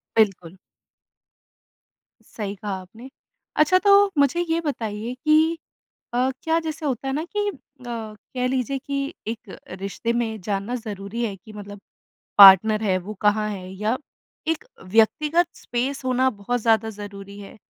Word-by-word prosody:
बिल्कुल। 190 -5 +1 1.8
सही 205 -2 -4
कहा 205 +1 -6
आपने। 225 +8 -13 0.5
अच्छा 305 +5 +5
तो 400 0 +5
मुझे 285 +4 +3
ये 330 - +2
बताइए 230 -6 -3
कि 315 +2 +4 0.6
अ, 255 +2 +2
क्या 325 0 +2
जैसे 315 0 -4
होता 270 -1 -2
है 270 - -1
ना 310 +3 -1
कि 415 +3 -2
अ, - - -10 0.4
कह 230 +2 -5
लीजिए 260 +1 -1
कि 280 +1 -4 0.3
एक 225 -3 -6 0.2
रिश्ते 200 +4 -2
में 220 -2 -2
जानना 200 +5 -2
ज़रूरी 205 +3 -4
है 205 - -2
कि 205 +3 -15
मतलब 205 -1 -9 0.6
पार्टनर 205 +2 +9
है 190 -3 +2
वो 215 - -4
कहाँ 210 +1 +3
है 185 -3 -6
या 210 +5 -1 0.5
एक 325 -1 -1 0.3
व्यक्तिगत 305 - +3
स्पेस 265 +3 -2
होना 255 +1 +3
बहुत 245 +5 -1
ज़्यादा 225 -1 +3
ज़रूरी 200 0 -9
है? 200 +2 -11
225 Hz, 145 wpm, -23 LUFS, 205-275 Hz, 1.8 s, पार्टनर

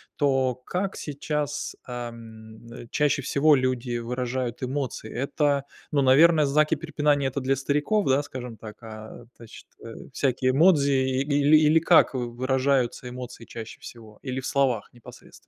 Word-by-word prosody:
то 135 -3 +1
как 180 +10 -4
сейчас, 150 0 -4
ам, 115 -2 -9
э, 120 0 -10
чаще 145 -1 +1
всего 145 +3 +3
люди 130 -2 -1
выражают 125 +1 -3
эмоции? 130 -4 -4
Это 140 +1 0 0.3
ну, 145 - +2
наверное, 150 +4 +5
знаки 150 +3 +2
препинания- 145 -3 0
это 130 - -4
для 135 +1 +1
стариков, 150 +10 0
да, 135 +1 +3
скажем 125 -5 -8
так, 110 -1 -10
а 110 +1 -10
тачт 115 -1 -13 0.2
а 115 - -8 0.2
всякие 130 -1 +1
эмодзи 145 -1 +4
или, 140 +3 +3
или 155 +1 +4
как 165 -3 +4
в 120 -2 -4
выражаются 130 -1 0
эмоции 125 -1 -9
чаще 115 -1 -9
всего 110 -3 -12
или 130 -1 -4
в 130 - -7
словах 130 -6 0
непосредственно? 120 -1 -15
130 Hz, 145 wpm, -25 LUFS, 120-145 Hz, 0.3 s, наверное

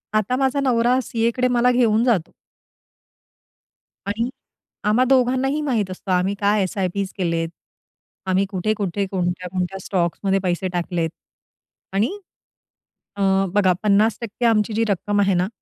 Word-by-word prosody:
आता 215 +3 +1
माझा 270 +1 +1
नवरा 250 -1 +2
सीएकडे 235 +2 0
मला 250 +1 +4
घेऊन 230 -3 +3
जातो. 220 -10 +1 1.8
आणि 225 +4 -1 0.6
आम्हा 230 +4 +4
दोघांनाही 260 +2 +2
माहीत 235 -10 -1
असतं 185 +1 -4
आम्ही 185 +2 +1
काय 205 0 +3
एस-आय-पीस 190 +1 -2
केलेत. 165 -2 0 0.8
आम्ही 190 +1 +2
कुठे-कुठे 200 0 -1
कोणत्या-कोणत्या 180 0 -2
स्टॉक्समध्ये 190 +2 0
पैसे 185 0 -1
टाकलेत 175 -2 -1 0.8
आणि 220 - 0 1.0
अ, 200 - -5 0.3
बघा 195 -3 +4
50% 215 +3 +1
आमची 220 -1 +2
जी 225 +2 +1
रक्कम 205 +1 0
आहे 195 -1 +3
ना 180 +1 +1
205 Hz, 120 wpm, -22 LUFS, 185-235 Hz, 1.8 s, मला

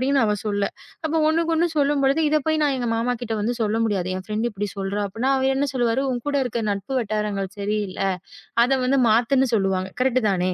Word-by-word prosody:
அப்டின்னு 270 0 +2
அவ 210 0 +1
சொல்ல. 205 -1 0 0.4
அப்ப 320 +1 -1
ஒண்ணுக்கொண்ணு 330 +1 +1
சொல்லும்பொழுது, 280 +1 +2
இத 305 - +4
போய் 310 -1 +2
நான் 280 -2 +1
எங்க 245 -1 -2
மாமா 245 +2 0
கிட்ட 225 -1 -3
வந்து 240 +3 0
சொல்ல 215 +1 0
முடியாது. 190 -4 -1
என் 185 - -6
ஃப்ரெண்ட் 220 +3 0
இப்டி 205 -1 -4
சொல்றா 200 +1 -2
அப்பன்னா 230 +7 -1
அவரு 265 0 +2
என்ன 280 +1 +1
சொல்லுவாரு? 240 +1 +1
"உன் 240 -1 -4
கூட 285 - 0
இருக்க 240 -1 -3
நட்பு 200 +6 -4
வட்டாரங்கள் 210 -3 -2
சரியில்ல. 205 -1 -2 0.6
அத 250 - 0
வந்து 270 +1 +3
மாத்து."ன்னு 255 +3 +3
சொல்லுவாங்க. 190 -2 0
கரெக்ட் 255 -2 +2
தானே? 185 0 0
235 Hz, 200 wpm, -23 LUFS, 205-270 Hz, 0.6 s, இத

